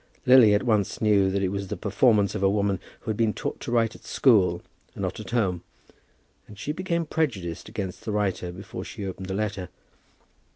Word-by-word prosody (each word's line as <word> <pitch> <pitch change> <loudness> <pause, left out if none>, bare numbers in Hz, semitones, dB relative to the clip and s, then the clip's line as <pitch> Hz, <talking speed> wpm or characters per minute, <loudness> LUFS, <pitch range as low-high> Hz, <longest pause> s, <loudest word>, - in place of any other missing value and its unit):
Lily 125 -5 +7
at 105 - +1
once 110 -5 +1
knew 100 -3 +3
that 100 +1 -1
it 95 - +1
was 100 0 -3
the - - -4
performance 105 -1 +2
of 105 - -3
a 95 - +4
woman 100 -1 +1 0.2
who 115 - -3
had 105 - -4
been 110 -2 +1
taught - - -4
to - - -6
write 115 -2 +2
at - - -15
school, 95 -9 +3 0.3
and - - -5
not - - -3
at - - -8
home, 95 -8 0 0.9
and 105 - -13
she 140 - -3
became 170 0 -1
prejudiced 110 - -2
against 100 -4 -5
the 110 - -3
writer 100 -4 -1
before 95 +3 -8
she 105 - -7
opened 95 0 -6
the 95 - -3
letter. 100 -3 -3
105 Hz, 205 wpm, -26 LUFS, 95-115 Hz, 0.9 s, Lily